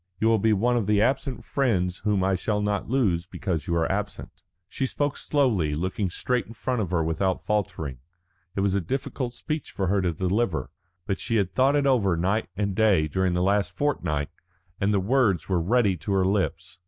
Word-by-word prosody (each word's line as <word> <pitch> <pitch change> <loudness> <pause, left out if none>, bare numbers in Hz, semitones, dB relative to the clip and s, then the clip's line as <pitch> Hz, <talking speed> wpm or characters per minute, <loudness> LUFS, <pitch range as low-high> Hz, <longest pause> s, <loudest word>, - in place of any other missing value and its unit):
You 110 - +3
will 115 -1 +4
be 110 +2 +3
one 120 +4 +2
of 110 -4 -1
the 105 -1 +3
absent 130 +3 0
friends 95 -10 0
whom 105 -3 +1
I 95 +1 +2
shall 105 +3 0
not 105 0 -1
lose 95 -10 +1
because 90 -5 -3
you 85 - 0
are 80 -1 +1
absent." 105 +1 -4 0.3
She 130 +7 -2
spoke 145 +2 -1
slowly, 110 - +1
looking 95 +4 -1
straight 125 +7 -1
in 115 - -10
front 125 +1 -1
of 95 - -2
her 85 -2 +1
without 85 +4 0
faltering. 80 -11 -2 0.6
It 95 - 0
was 100 -1 +1
a 100 - +1
difficult 125 - -3
speech 155 +2 -4
for 95 - -2
her 100 0 +2
to 90 -2 +1
deliver, 95 +2 -1 0.3
but 95 - -2
she 115 - -2
had 100 -4 +1
thought 135 +2 +3
over 110 -10 +3
it - - -4
night 100 +6 0
and 100 -1 0
day 100 -6 +3
during 95 +3 0
this 90 - +1
last 100 -2 +1
fortnight, 85 - -1 0.5
and 100 +1 +2
the 100 - +2
words 100 - +2
were 90 -3 +1
ready 100 +1 +2
to 100 +5 -3
her 95 -1 +3
lips. 95 -2 -1
100 Hz, 205 wpm, -26 LUFS, 90-115 Hz, 0.6 s, will